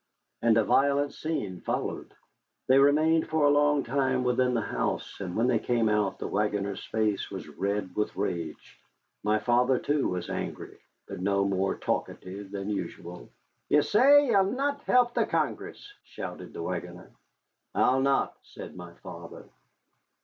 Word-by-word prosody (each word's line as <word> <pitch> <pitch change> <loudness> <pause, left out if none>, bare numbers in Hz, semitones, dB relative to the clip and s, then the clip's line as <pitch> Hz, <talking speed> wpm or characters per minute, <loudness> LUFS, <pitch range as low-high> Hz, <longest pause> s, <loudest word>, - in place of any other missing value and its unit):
And 115 -1 +4
a 115 - +4
violent 140 +4 +2
scene 105 - -4
followed. - - -4 0.5
They 130 +1 +5
remained 155 +3 +4
for 160 -2 +2
a 145 - +5
long 145 -1 +3
time 130 0 0
within 125 0 +2
the 115 - +1
house, - - -3
and 90 -3 -5
when 115 - +2
they 125 -3 +2
came 115 -1 +1
out 105 -2 +1
the - - -4
wagoner's 100 -1 -1
face 110 -3 -1
was - - -7
red 100 -2 -3
with 105 - -1
rage. 85 -3 -4 0.4
My 105 +1 +2
father, 125 +3 +2
too, 145 +2 0
was 90 -1 -3
angry, - - -5 0.3
but - - -8
no 100 +1 +1
more 95 0 0
talkative 95 +2 -4
than 100 +1 -4
usual. 90 -3 -6 0.4
"Ye 150 0 +5
say 280 +7 +6
ye'll 200 -7 +4
not 280 +2 -1
help 245 -1 +3
the - - +1
Congress?" 410 - -3
shouted - - -8
the - - -5
wagoner. - - -6 0.6
"I'll 130 +1 +3
not," 135 0 +1
said - - -11
my 90 -1 -10
father. - - -10
120 Hz, 155 wpm, -28 LUFS, 100-145 Hz, 0.6 s, say